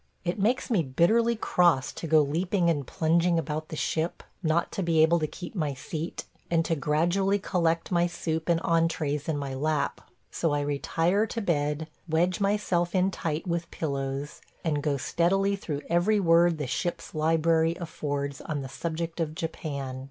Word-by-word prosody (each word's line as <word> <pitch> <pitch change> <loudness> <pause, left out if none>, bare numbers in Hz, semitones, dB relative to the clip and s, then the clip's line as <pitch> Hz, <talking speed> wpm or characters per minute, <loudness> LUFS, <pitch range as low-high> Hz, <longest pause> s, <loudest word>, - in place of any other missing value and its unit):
It 175 +4 -1
makes 235 +6 +1
me 205 -7 +4
bitterly 215 - +3
cross 175 - +2
to 165 - -6
go 155 0 +5
leaping 170 +4 +1
and 145 -5 -2
plunging 170 +2 +2
about 155 -1 -3
the 160 - -5
ship, 160 +2 -2 0.2
not 165 0 +1
to - - -3
be 165 -3 +4
able 170 +2 +4
to 155 - 0
keep 175 +3 -8
my 155 -8 -1
seat, 160 +5 -5 0.2
and 165 -1 +2
to 165 - +1
gradually 175 +7 +1
collect 170 -4 0
my 175 -1 +3
soup 160 -1 -3
and 170 -1 +4
entrées 160 -3 0
in 155 - 0
my 140 -2 -4
lap; 150 +2 -1 0.3
so 165 -3 0
I 145 - +1
retire 165 +8 +1
to 230 - -3
bed, 150 -3 0 0.2
wedge 175 +3 +2
myself 195 -3 +1
in 185 +1 +3
tight 160 -3 -3
with 170 -1 -2
pillows, 140 -1 -3 0.2
and 150 -3 0
go 145 -2 0
steadily 195 +7 +1
through 150 -7 -5
every 180 +5 +3
word 170 -2 +4
the 150 - -3
ship's 170 +7 -3
library 160 +1 +2
affords 145 -4 -3
on 145 -3 -3
the 135 - -7
subject 165 +3 -4
of 155 -2 -2
Japan. 140 -5 -4
165 Hz, 175 wpm, -27 LUFS, 150-175 Hz, 0.3 s, go